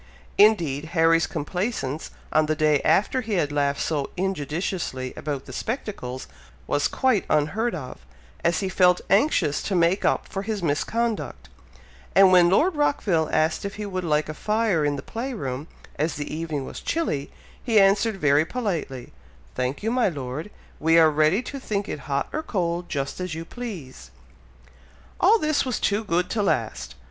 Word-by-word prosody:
Indeed, 170 -9 +4
Harry's 165 0 +4
complaisance 160 - -3 0.2
on 155 0 +3
the 155 - +1
day 150 -2 +3
after 255 +6 +2
he 225 -2 -4
had 150 -6 +1
laughed 140 -1 0
so 145 -4 -1
injudiciously 160 -6 -2
about 145 -3 -4
the 130 - -10
spectacles, 135 - -4 0.4
was 145 - +1
quite 260 -6 +1
unheard 200 +11 +1
of, 130 - -8 0.4
as 170 +3 +2
he 195 - -1
felt 180 -1 +3
anxious 200 - +3
to 195 - -2
make 175 +3 +2
up - - +1
for 195 - -4
his 205 -2 -3
misconduct; 220 +9 -1 0.7
and 195 -1 +7
when 175 -1 +6
Lord 315 - +3
Rockville 200 - +1
asked 155 +1 +1
if 200 0 -5
he 210 - -5
would 185 -2 -3
like 150 -2 +1
a 155 - -4
fire 210 -3 +1
in 145 -1 +1
the 140 - -6
play 245 +3 -5
room, 135 - -4 0.3
as 155 +2 0
the 145 0 -5
evening 155 -3 -3
was - - -7
chilly, 230 - -2 0.3
he 225 -3 +4
answered 200 +2 +3
very 145 -3 +4
politely, 165 - -4 0.4
"Thank 125 +8 -2
you, 225 - 0
my 250 -4 +2
Lord! 145 +2 -5 0.3
We 165 +1 +4
are 160 -1 +6
ready 155 +9 +2
to 275 - -6
think 205 -5 -2
it - - -4
hot 140 0 0
or 310 - -1
cold, 175 - -2
just 140 +2 -3
as 180 -3 -3
you 165 +1 -6
please!" 165 - -8 1.1
All 415 +6 +6
this 310 -6 +1
was 255 -3 -2
too 205 +2 +1
good 180 -3 0
to 220 - 0
last! 110 - -1
170 Hz, 170 wpm, -24 LUFS, 145-210 Hz, 1.1 s, and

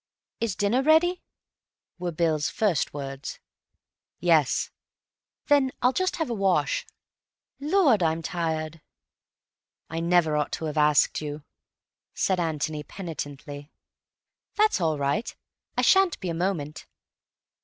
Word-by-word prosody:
"Is 225 -5 -1
dinner 205 +6 +1
ready?" 320 +5 +3 0.8
were 175 -1 -2
Bill's 155 -2 0
first 200 -9 0
words. 135 -1 -6 0.8
"Yes." 160 -6 +2 0.7
"Then 285 -2 +4
I'll 250 +1 +4
just 370 +3 0
have 320 - -2
a 240 - -2
wash. 200 - +1 0.7
Lord, 295 - +3
I'm 165 0 +1
tired." 160 -2 -3 1.1
"I 165 - -2
never 170 -2 +3
ought 150 -1 0
to 160 - -3
have 155 -1 -3
asked 150 0 +3
you," 150 0 -6 0.7
said 190 -2 +1
Antony 155 -2 -2
penitently. 145 -4 -7 0.8
"That's 430 - +3
all 160 -2 +1
right. 140 +9 -1 0.4
I - - +2
shan't 385 -3 +4
be 185 - -4
a - - -1
moment." 165 -4 -3
170 Hz, 120 wpm, -26 LUFS, 150-230 Hz, 1.1 s, Then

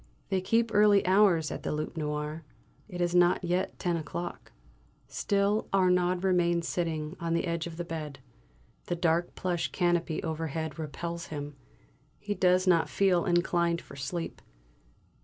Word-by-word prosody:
They 190 -1 +1
keep 225 +3 +1
early 205 -1 +5
hours 185 -5 +4
at - - -5
the - - -3
"Loup 155 +2 -3
Noir"; 150 0 -3 0.5
it 180 -2 -5
is 175 0 +1
not 175 +1 +4
yet 180 +2 -1
ten 175 -2 0
o'clock. 170 +3 -6 0.6
Still 200 +1 0
Arnaud 180 -1 +3
remains 175 -2 +2
sitting 160 -2 -2
on 170 0 -1
the 170 - 0
edge 170 -1 -2
of 165 -1 -9
the 175 - -4
bed; 155 -4 -5 0.7
the 175 - -1
dark 170 0 0
plush 175 -2 -2
canopy 175 -3 0
overhead 160 0 -3
repels 170 +2 -5
him, 145 -1 -6 0.6
he 205 - -3
does 185 -1 +3
not 175 -3 +3
feel 190 -3 +2
inclined 175 -1 +1
for 140 - -13
sleep. 155 +5 -5
175 Hz, 150 wpm, -29 LUFS, 160-185 Hz, 0.7 s, early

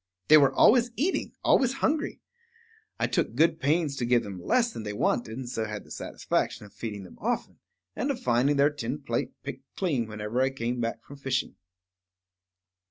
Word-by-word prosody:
They 155 - +10
were 140 -2 +5
always 245 +1 +5
eating, 335 +9 -1
always 260 -1 +4
hungry. 300 +3 -1 0.8
I - - +2
took - - 0
good 160 0 +3
pains 150 0 +1
to 125 - -2
give 120 0 +3
them 95 -3 -7
less 240 - +2
than - - -5
they 105 -1 -4
wanted, 110 +2 0
and 130 -2 -5
so 110 -2 -2
had 105 -1 -5
the - - -18
satisfaction - - -2
of 105 - -16
feeding 105 -4 -6
them 90 - -14
often, - - -2 0.4
and 280 - -1
of 270 -3 -1
finding 135 - +2
their 140 +2 +4
tin 130 -6 -4
plate - - -1
picked - - -6
clean 140 - 0
whenever 105 +3 -2
I 130 - +3
came 125 -2 -3
back 115 0 -3
from 140 - -12
fishing. 135 -2 -2
130 Hz, 185 wpm, -28 LUFS, 115-165 Hz, 0.8 s, They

